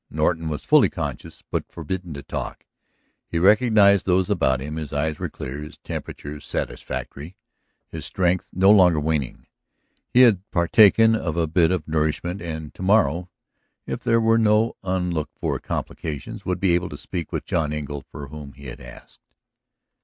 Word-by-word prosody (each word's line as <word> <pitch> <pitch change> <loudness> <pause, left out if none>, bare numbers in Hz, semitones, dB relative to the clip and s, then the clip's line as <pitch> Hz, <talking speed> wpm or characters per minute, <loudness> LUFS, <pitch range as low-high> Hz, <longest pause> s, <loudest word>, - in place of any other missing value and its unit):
Norton 80 +1 0
was 75 - -4
fully - - +5
conscious, - - -6
but - - -3
forbidden 85 +2 -5
to 70 - -8
talk; - - -6 0.6
he - - -3
recognized 100 +1 +5
those 90 0 +2
about 65 0 +2
him, 75 +4 -5
his 75 -3 -5
eyes 75 +1 -1
were - - -3
clear, 65 +2 -7
his 75 +1 -9
temperature 75 +1 -7
satisfactory, 75 +3 -5 0.5
his - - -8
strength 90 0 0
no 95 +2 +5
longer 90 -6 +6
waning. 75 -4 -2 0.6
He 125 - +5
had 110 -8 +6
partaken 105 +6 +5
of 85 -7 -3
a 85 - +2
bit 80 +1 +3
of 90 -4 -2
nourishment 80 +4 -1
and 80 -3 -6
to - - -12
morrow, 95 -3 +2 0.6
if - - -4
there 115 - +2
were 115 0 +3
no 110 +1 +3
unlooked 90 -5 -2
for - - -2
complications, 75 -3 -5
would 90 - -1
be 95 -3 +2
able 90 +1 0
to 75 - -8
speak 85 0 -6
with - - -3
John 75 -2 0
Engle 75 -2 -4
for 70 -2 -8
whom 75 -1 -9
he 70 +3 -14
had - - -8
asked. - - -14
85 Hz, 170 wpm, -23 LUFS, 75-95 Hz, 0.6 s, longer